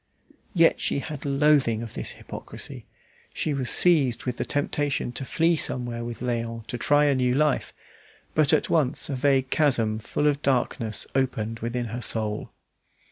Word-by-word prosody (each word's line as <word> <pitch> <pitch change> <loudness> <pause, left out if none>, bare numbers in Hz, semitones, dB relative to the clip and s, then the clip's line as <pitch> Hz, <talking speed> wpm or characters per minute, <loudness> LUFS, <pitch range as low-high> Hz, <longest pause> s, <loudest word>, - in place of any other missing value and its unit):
Yet 165 -1 +4
she - - 0
had 145 0 -6
loathing 140 -5 +3
of 115 - -8
this - - -5
hypocrisy. - - -8 0.5
She 155 - -1
was 130 -3 -1
seized 145 -9 +4
with 125 -2 -2
the - - -2
temptation 145 -3 -1
to 130 - -5
flee 165 +5 +2
somewhere 120 -5 -1
with 120 -1 -6
Léon 115 -2 -3
to 120 - -5
try 145 +4 +4
a 145 - +3
new 125 -1 +1
life; 150 0 +1 0.6
but 155 -2 +3
at - - +3
once 150 -2 +1
a - - -1
vague 135 0 +2
chasm 115 -8 +2
full 145 - -2
of 145 -1 +2
darkness 120 -5 0
opened 115 -4 -1
within 120 +1 -3
her 120 - -4
soul. 110 -2 -3
130 Hz, 165 wpm, -25 LUFS, 115-145 Hz, 0.6 s, Yet